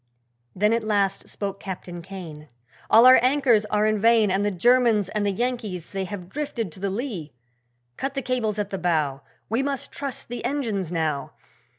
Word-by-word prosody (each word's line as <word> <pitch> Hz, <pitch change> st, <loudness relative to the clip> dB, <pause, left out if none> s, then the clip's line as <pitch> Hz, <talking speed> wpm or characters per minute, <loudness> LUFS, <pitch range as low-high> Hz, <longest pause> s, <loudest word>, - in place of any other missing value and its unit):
Then 210 Hz, +4 st, +3 dB
at 230 Hz, -1 st, 0 dB
last 200 Hz, -2 st, 0 dB
spoke 200 Hz, -1 st, -4 dB
Captain 180 Hz, -2 st, -7 dB
Kane, 170 Hz, -5 st, -9 dB, 0.4 s
'All 230 Hz, +2 st, +7 dB
our 255 Hz, -1 st, +9 dB
anchors 255 Hz, -4 st, +3 dB
are 210 Hz, 0 st, +1 dB
in 215 Hz, -1 st, +1 dB
vain, 225 Hz, -2 st, +4 dB
And 195 Hz, +2 st, +1 dB
the 205 Hz, -, +2 dB
Germans 220 Hz, +1 st, +3 dB
and 210 Hz, -1 st, -1 dB
the -, -, +2 dB
Yankees 215 Hz, -6 st, -3 dB
they 195 Hz, -1 st, -2 dB
have 185 Hz, -2 st, -7 dB
drifted 240 Hz, -, -4 dB
to 170 Hz, -, -13 dB
the 195 Hz, +1 st, -1 dB
lee! 195 Hz, -, -4 dB, 0.6 s
Cut 275 Hz, +1 st, -3 dB
the 275 Hz, -, -2 dB
cables 230 Hz, -5 st, -1 dB
at 205 Hz, -1 st, -2 dB
the 195 Hz, -, -3 dB
bow! 155 Hz, -6 st, 0 dB, 0.3 s
We 230 Hz, +4 st, 0 dB
must 275 Hz, -1 st, -3 dB
trust 275 Hz, -3 st, -6 dB
the 240 Hz, 0 st, -6 dB
engines 230 Hz, -, -2 dB
now! 155 Hz, -4 st, -2 dB
210 Hz, 185 wpm, -24 LUFS, 185-240 Hz, 0.6 s, our